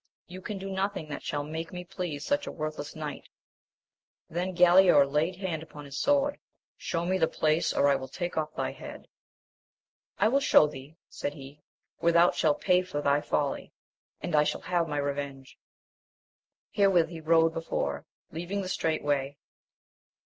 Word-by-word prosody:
— -, -, -79 dB
You 185 Hz, -, -8 dB
can 205 Hz, +2 st, -5 dB
do 195 Hz, 0 st, -6 dB
nothing 190 Hz, -4 st, -2 dB
that 145 Hz, -, -5 dB
shall 145 Hz, -1 st, -3 dB
make 160 Hz, +2 st, -5 dB
me 180 Hz, 0 st, -6 dB
please 175 Hz, -5 st, -5 dB
such 285 Hz, +1 st, 0 dB
a -, -, -3 dB
worthless 155 Hz, -2 st, -5 dB
knight. 150 Hz, -2 st, -6 dB, 1.0 s
Then 180 Hz, +2 st, -2 dB
Galaor 175 Hz, -4 st, +7 dB
laid 150 Hz, +6 st, 0 dB
hand 175 Hz, -4 st, -3 dB
upon 150 Hz, -2 st, -11 dB
his 140 Hz, 0 st, -6 dB
sword 285 Hz, 0 st, +2 dB, 0.2 s
;— -, -, -72 dB
Shew 170 Hz, 0 st, -3 dB
me 185 Hz, +1 st, +1 dB
the 160 Hz, -, +4 dB
place, 155 Hz, +2 st, +1 dB
or 140 Hz, -, +3 dB
I 140 Hz, -, +4 dB
will 130 Hz, 0 st, -7 dB
take 175 Hz, +4 st, -4 dB
off 155 Hz, -1 st, -1 dB
thy -, -, -2 dB
head. -, -, -10 dB, 1.1 s
I 205 Hz, -, +4 dB
will 270 Hz, +5 st, +3 dB
shew 155 Hz, -, +6 dB
thee, 145 Hz, +2 st, -11 dB
said 145 Hz, -, -5 dB
he, 140 Hz, +1 st, -12 dB, 0.4 s
where 170 Hz, 0 st, +3 dB
thou 170 Hz, +1 st, +6 dB
shalt 150 Hz, -2 st, +1 dB
pay 180 Hz, -1 st, +4 dB
for 180 Hz, -5 st, -4 dB
thy 145 Hz, 0 st, +2 dB
folly, 145 Hz, -1 st, -2 dB, 0.5 s
and 175 Hz, -, -2 dB
I 150 Hz, -, +6 dB
shall -, -, -2 dB
have 175 Hz, -2 st, 0 dB
my 150 Hz, -2 st, -3 dB
revenge. 140 Hz, -1 st, -4 dB, 1.1 s
Herewith 190 Hz, -5 st, +3 dB
he 165 Hz, -2 st, -8 dB
rode 165 Hz, 0 st, +4 dB
before, 70 Hz, -, -3 dB, 0.2 s
leaving 180 Hz, +5 st, -3 dB
the 185 Hz, -, -5 dB
straight 160 Hz, -3 st, -1 dB
way. 145 Hz, -1 st, -1 dB
160 Hz, 180 wpm, -28 LUFS, 145-180 Hz, 1.1 s, Galaor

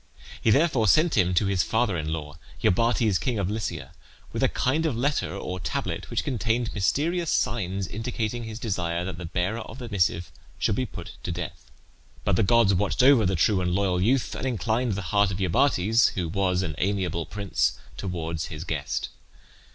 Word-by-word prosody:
He -, -, +2 dB
therefore 135 Hz, -3 st, +3 dB
sent 155 Hz, -, +4 dB
him 90 Hz, -3 st, +3 dB
to 100 Hz, -, +3 dB
his 95 Hz, -2 st, +2 dB
father 110 Hz, +1 st, +1 dB
in 80 Hz, -1 st, -2 dB
law, 75 Hz, -1 st, -5 dB, 0.2 s
Iobates, 115 Hz, 0 st, +3 dB
king 125 Hz, -4 st, -1 dB
of 100 Hz, -1 st, -1 dB
Lycia, 110 Hz, -1 st, -4 dB, 0.4 s
with -, -, -2 dB
a -, -, +4 dB
kind 155 Hz, +6 st, +1 dB
of 130 Hz, -7 st, -2 dB
letter 140 Hz, -3 st, 0 dB
or 90 Hz, -2 st, -4 dB
tablet -, -, -3 dB
which -, -, -1 dB
contained 120 Hz, -2 st, -1 dB
mysterious 155 Hz, -, 0 dB
signs, 95 Hz, -4 st, 0 dB
indicating 115 Hz, +2 st, -3 dB
his 110 Hz, -1 st, -6 dB
desire 90 Hz, -7 st, -2 dB
that 90 Hz, -2 st, -5 dB
the 90 Hz, -, -5 dB
bearer 95 Hz, +7 st, -1 dB
of 110 Hz, +1 st, -8 dB
the 125 Hz, -3 st, -7 dB
missive 90 Hz, -4 st, 0 dB, 0.3 s
should 110 Hz, -, +1 dB
be 130 Hz, +4 st, -1 dB
put -, -, -9 dB
to -, -, -3 dB
death. 85 Hz, -7 st, -6 dB, 0.5 s
But -, -, +2 dB
the -, -, +3 dB
gods 110 Hz, 0 st, +4 dB
watched 100 Hz, +6 st, +1 dB
over 130 Hz, -6 st, +6 dB
the 95 Hz, -, +1 dB
true 95 Hz, +3 st, +3 dB
and 90 Hz, -1 st, 0 dB
loyal 95 Hz, -2 st, +1 dB
youth, 125 Hz, +6 st, +2 dB
and 130 Hz, -, -3 dB
inclined 120 Hz, -1 st, 0 dB
the 100 Hz, 0 st, -3 dB
heart 100 Hz, -1 st, +4 dB
of 95 Hz, -, -3 dB
Iobates, 105 Hz, -, +3 dB
who 90 Hz, -3 st, -1 dB
was 95 Hz, 0 st, +1 dB
an 80 Hz, -4 st, -3 dB
amiable 90 Hz, -4 st, -1 dB
prince, 85 Hz, -8 st, 0 dB, 0.2 s
towards 85 Hz, -3 st, -3 dB
his 75 Hz, -2 st, -6 dB
guest. 75 Hz, -6 st, -3 dB
100 Hz, 190 wpm, -26 LUFS, 90-115 Hz, 0.5 s, over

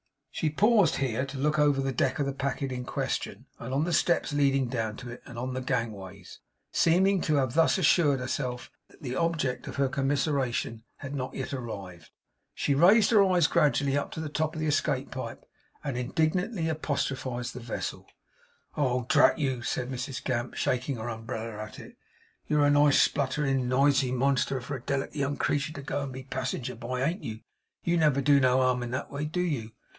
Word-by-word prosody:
She 155 Hz, -, -1 dB
paused 205 Hz, +2 st, +4 dB
here 130 Hz, -2 st, -1 dB
to 135 Hz, 0 st, -7 dB
look 150 Hz, +3 st, +1 dB
over 145 Hz, -2 st, +4 dB
the 135 Hz, 0 st, 0 dB
deck 125 Hz, -, 0 dB
of 145 Hz, -, 0 dB
the 140 Hz, -, -2 dB
packet 135 Hz, 0 st, -2 dB
in 125 Hz, -1 st, -4 dB
question, -, -, -3 dB
and 115 Hz, -, -6 dB
on 140 Hz, +3 st, +1 dB
the 170 Hz, +1 st, -1 dB
steps 170 Hz, -2 st, +2 dB
leading 135 Hz, -2 st, +2 dB
down 110 Hz, -3 st, -2 dB
to 125 Hz, -2 st, -8 dB
it, 120 Hz, -, -9 dB
and 120 Hz, -4 st, -10 dB
on 125 Hz, +2 st, -3 dB
the 130 Hz, -, -3 dB
gangways. 100 Hz, -7 st, -4 dB, 0.3 s
Seeming 190 Hz, +3 st, +3 dB
to 155 Hz, -, +1 dB
have 130 Hz, -4 st, +1 dB
thus 165 Hz, +4 st, +4 dB
assured 150 Hz, -5 st, +4 dB
herself 125 Hz, -1 st, -3 dB, 0.2 s
that -, -, -21 dB
the 130 Hz, -2 st, -3 dB
object 155 Hz, -5 st, -1 dB
of -, -, -6 dB
her 140 Hz, -1 st, +2 dB
commiseration 135 Hz, -4 st, -1 dB
had 135 Hz, 0 st, -8 dB
not 130 Hz, -2 st, -4 dB
yet -, -, -4 dB
arrived, 100 Hz, -, -7 dB, 0.5 s
she 140 Hz, -, +1 dB
raised 195 Hz, +10 st, +5 dB
her 215 Hz, -3 st, +6 dB
eyes 180 Hz, -4 st, +3 dB
gradually 140 Hz, -2 st, +2 dB
up 145 Hz, -, -1 dB
to -, -, -6 dB
the 160 Hz, -1 st, -4 dB
top 155 Hz, +2 st, -1 dB
of -, -, -4 dB
the 155 Hz, -, -1 dB
escape 145 Hz, -3 st, 0 dB
pipe, -, -, -6 dB, 0.4 s
and 140 Hz, -3 st, -3 dB
indignantly 160 Hz, -, 0 dB
apostrophised 135 Hz, -5 st, -2 dB
the 125 Hz, -, -7 dB
vessel: 115 Hz, -1 st, -5 dB, 0.7 s
'Oh, 125 Hz, -4 st, 0 dB
drat -, -, +5 dB
you!' 135 Hz, -5 st, -1 dB
said 125 Hz, +1 st, -2 dB
Mrs 130 Hz, +1 st, -4 dB
Gamp, 120 Hz, -1 st, -2 dB
shaking 130 Hz, +2 st, -1 dB
her 115 Hz, 0 st, -5 dB
umbrella 110 Hz, -1 st, -5 dB
at 110 Hz, -, -10 dB
it, -, -, -11 dB, 0.5 s
'you're 150 Hz, -1 st, +3 dB
a 145 Hz, -, +4 dB
nice 145 Hz, -1 st, +5 dB
spluttering 135 Hz, -2 st, +1 dB
nisy 135 Hz, 0 st, +3 dB
monster 135 Hz, +1 st, +1 dB
for 135 Hz, +4 st, -5 dB
a -, -, -12 dB
delicate 140 Hz, +3 st, -2 dB
young 140 Hz, -1 st, -1 dB
creetur 145 Hz, +1 st, 0 dB
to 140 Hz, -, -8 dB
go 145 Hz, +1 st, -2 dB
and 140 Hz, -1 st, -4 dB
be 130 Hz, +1 st, -7 dB
a -, -, -16 dB
passinger 130 Hz, -1 st, -3 dB
by; 125 Hz, +2 st, -4 dB
ain't 165 Hz, +7 st, -1 dB
you! 110 Hz, 0 st, -6 dB, 0.4 s
YOU 170 Hz, 0 st, +1 dB
never 150 Hz, -4 st, +3 dB
do 140 Hz, +1 st, +5 dB
no 130 Hz, -1 st, +4 dB
harm 125 Hz, -1 st, +2 dB
in 120 Hz, -, -4 dB
that 130 Hz, -, -4 dB
way, 145 Hz, +1 st, -3 dB
do 170 Hz, +4 st, -2 dB
you? 130 Hz, -11 st, -2 dB
135 Hz, 200 wpm, -28 LUFS, 125-150 Hz, 0.7 s, her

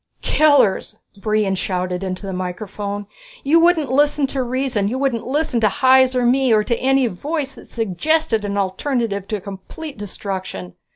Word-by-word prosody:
"Killers!" 260 Hz, -9 st, +3 dB, 0.2 s
Brion 210 Hz, -1 st, 0 dB
shouted 185 Hz, -1 st, -2 dB
into 185 Hz, +1 st, -4 dB
the 195 Hz, -, -4 dB
microphone. 200 Hz, +2 st, -4 dB, 0.4 s
"You 310 Hz, +4 st, +4 dB
wouldn't 330 Hz, -6 st, +3 dB
listen 290 Hz, +1 st, +3 dB
to 270 Hz, -, 0 dB
reason, 250 Hz, -4 st, -1 dB
you 245 Hz, +5 st, -2 dB
wouldn't 260 Hz, -4 st, -1 dB
listen 270 Hz, -3 st, 0 dB
to 215 Hz, -, +4 dB
Hys, 260 Hz, 0 st, +4 dB
or 250 Hz, -1 st, +2 dB
me, 260 Hz, +1 st, +3 dB
or 215 Hz, -1 st, +4 dB
to 235 Hz, -, 0 dB
any 270 Hz, 0 st, +2 dB
voice 275 Hz, -, -3 dB
that -, -, -15 dB
suggested 230 Hz, -, 0 dB
an 200 Hz, 0 st, -2 dB
alternative 200 Hz, 0 st, -1 dB
to 215 Hz, -, -2 dB
complete 200 Hz, -, -9 dB
destruction. 190 Hz, -, -5 dB
230 Hz, 160 wpm, -20 LUFS, 200-270 Hz, 0.4 s, You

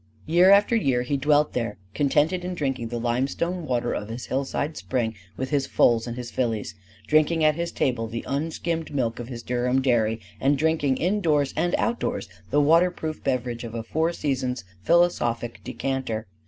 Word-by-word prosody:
Year 175 Hz, +3 st, +5 dB
after 200 Hz, +4 st, +5 dB
year 130 Hz, -, +2 dB
he 135 Hz, +3 st, -1 dB
dwelt 145 Hz, +2 st, +2 dB
there, 115 Hz, -4 st, -2 dB, 0.2 s
contented 150 Hz, -, +2 dB
in 180 Hz, 0 st, -3 dB
drinking 135 Hz, -7 st, -2 dB
the 120 Hz, +1 st, -4 dB
limestone 140 Hz, +9 st, -1 dB
water 120 Hz, -2 st, 0 dB
of 105 Hz, -, -4 dB
his 120 Hz, +2 st, -5 dB
hillside 140 Hz, +3 st, -2 dB
spring 120 Hz, -4 st, -2 dB, 0.2 s
with 130 Hz, +2 st, -3 dB
his 140 Hz, -2 st, +1 dB
foals 115 Hz, -1 st, +3 dB
and 120 Hz, 0 st, -5 dB
his 120 Hz, -1 st, -6 dB
fillies; 115 Hz, -5 st, -1 dB, 0.3 s
drinking 155 Hz, +3 st, +3 dB
at 155 Hz, 0 st, +5 dB
his 170 Hz, +2 st, -3 dB
table 120 Hz, -3 st, 0 dB
the 115 Hz, +1 st, -5 dB
unskimmed 160 Hz, +3 st, -2 dB
milk 115 Hz, -4 st, -1 dB
of 120 Hz, -, -6 dB
his 120 Hz, -2 st, -7 dB
Durham 125 Hz, +1 st, +1 dB
dairy; 115 Hz, -4 st, +2 dB, 0.2 s
and 140 Hz, +1 st, +2 dB
drinking 155 Hz, -3 st, +1 dB
indoors 165 Hz, -7 st, +1 dB
and 175 Hz, -, +1 dB
outdoors 235 Hz, -, -1 dB, 0.2 s
the 145 Hz, -, +3 dB
waterproof 160 Hz, +1 st, +2 dB
beverage 120 Hz, -2 st, -1 dB
of 115 Hz, -1 st, -7 dB
a 115 Hz, -, -3 dB
four 160 Hz, +8 st, 0 dB
seasons 130 Hz, -6 st, -2 dB, 0.2 s
philosophic 120 Hz, -, +1 dB
decanter. 125 Hz, -2 st, -3 dB
135 Hz, 170 wpm, -25 LUFS, 120-160 Hz, 0.3 s, Year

